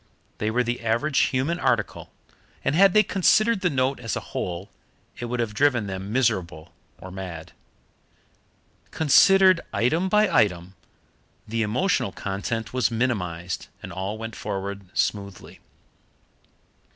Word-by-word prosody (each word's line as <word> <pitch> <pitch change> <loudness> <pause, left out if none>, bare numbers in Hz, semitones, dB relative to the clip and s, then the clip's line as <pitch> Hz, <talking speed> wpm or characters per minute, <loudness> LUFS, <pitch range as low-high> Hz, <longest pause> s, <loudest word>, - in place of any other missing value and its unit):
They 105 - 0
were 125 +3 +1
the 120 0 -3
average 120 +6 +1
human 140 +7 -1
article, - - -1 0.5
and - - +2
had 190 +3 +5
they 215 - +7
considered 215 +2 +2
the 180 - +2
note 135 -1 0
as 115 -2 -3
a - - -2
whole 90 +2 -4 0.5
it 120 - -4
would 120 +1 -3
have 115 -3 -1
driven 125 -2 +2
them 95 +1 -5
miserable 95 -11 -1 0.2
or 95 +2 -10
mad. 90 -4 -7 1.4
Considered 185 +4 +5
item 160 +10 +1
by 210 +2 +4
item, 95 - +1 0.7
the 115 +1 -2
emotional 110 - 0
content 105 +5 -4
was 125 -3 +2
minimized, 95 -8 -2 0.2
and 95 - -7
all 95 +4 -4
went 115 0 -7
forward 100 -1 -5
smoothly. 100 -2 -3
115 Hz, 130 wpm, -24 LUFS, 95-145 Hz, 1.4 s, they